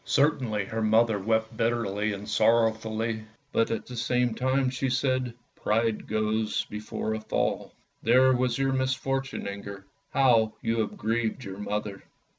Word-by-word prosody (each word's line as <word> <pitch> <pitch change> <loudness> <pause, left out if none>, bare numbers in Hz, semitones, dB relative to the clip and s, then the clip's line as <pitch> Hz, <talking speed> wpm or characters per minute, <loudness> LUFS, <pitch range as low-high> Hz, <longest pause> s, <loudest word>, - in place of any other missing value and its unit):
Certainly 125 -8 +1
her 110 +3 -3
mother 110 0 +3
wept 110 +2 0
bitterly 110 -3 0
and 100 +1 -7
sorrowfully, 110 0 +1 0.3
but 115 - +2
at 115 - -2
the 125 - -8
same 125 0 +1
time 130 +2 +1
she 130 +1 -1
said, 130 0 0 0.2
" - - -43
Pride 110 0 +1
goes 110 0 0
before 105 +1 -3
a 110 - -2
fall! 110 - -1 0.3
There 130 +3 +5
was 125 -1 +1
your 135 0 +1
misfortune, 135 +1 -1
Inger! 100 -1 -7 0.2
How 115 -5 +4
you 115 0 0
have 110 - -2
grieved 115 +2 -1
your 100 -2 -7
mother." 105 -1 -3
115 Hz, 150 wpm, -27 LUFS, 110-125 Hz, 0.3 s, There